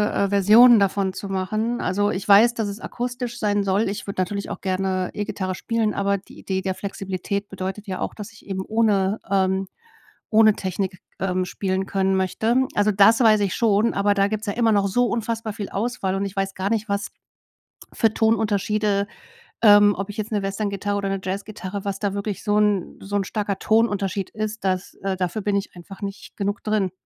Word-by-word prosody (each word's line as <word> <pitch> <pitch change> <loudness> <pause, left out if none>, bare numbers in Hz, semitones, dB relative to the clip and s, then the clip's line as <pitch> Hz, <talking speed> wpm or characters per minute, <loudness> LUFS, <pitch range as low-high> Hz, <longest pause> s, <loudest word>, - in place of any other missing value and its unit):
äh, 200 - +1
Versionen 215 +4 +7
davon 195 -1 +1
zu 200 - -6
machen. 215 +5 -1
Also, 205 +3 +1
ich 190 - -4
weiß, 210 +4 +7
dass 220 -3 -2
es 200 +2 -7
akustisch 245 0 -4
sein 205 -1 +1
soll. 195 +2 +1
Ich 205 +3 -5
würde 195 -1 -2
natürlich 200 +2 -3
auch - - -6
gerne 185 -1 -1
E-Gitarre 190 -3 -3
spielen, 225 +1 -1
aber 200 0 +1
die 195 - -15
Idee 190 -1 -2
der 190 0 -2
Flexibilität 200 +1 -4
bedeutet 195 +2 -5
ja 185 -1 -4
auch, - - -3
dass 210 +1 -8
ich 225 - -18
eben 190 -1 -3
ohne, 210 -2 +1
ähm 190 0 +1 0.6
ohne 220 -1 +6
Technik, 190 0 -3 0.2
ähm, 185 0 0
spielen 190 +1 -2
können 190 0 +1
möchte. 190 +5 0 0.2
Also, 205 +1 +3
das 205 +3 +5
weiß 220 -3 +6
ich 200 -2 0
schon. 220 0 +2
Aber 205 +1 +3
da 200 0 +3
gibt's 215 +1 -3
ja 200 - 0
immer 230 0 +2
noch 200 -1 +2
so 245 +6 +2
unfassbar 225 -1 -2
viel 205 -2 -6
Auswahl. 205 -3 -2
Und 195 - -1
ich 195 +1 -6
weiß 195 0 -1
gar 190 +1 -2
nicht, 220 -1 0
was 200 0 -1 0.9
für 225 -1 +2
Ton-Unterschiede, 210 -2 +1 0.6
ähm 205 -1 +7
ob 195 +1 -4
ich 205 - -8
jetzt 215 0 -4
'ne 210 -2 0
Westerngitarre 200 0 -2
oder 200 -1 -2
'ne 195 0 -1
Jazzgitarre, 200 0 -5
was 195 -1 -3
da 200 -2 -1
wirklich 200 0 -4
so 210 -1 +1
'n 210 -4 +1
so 205 +1 -5
'n 200 - 0
starker 200 -1 -2
Ton-Unterschied 205 -4 +1
ist, 215 0 -4
dass, 185 0 -1
äh 195 -1 -1
dafür 180 +3 -2
bin 205 0 0
ich 200 -1 -5
einfach 190 +3 -12
nicht 200 0 -7
genug 205 +2 -2
drin. 210 -4 0
200 Hz, 200 wpm, -23 LUFS, 195-215 Hz, 0.9 s, Versionen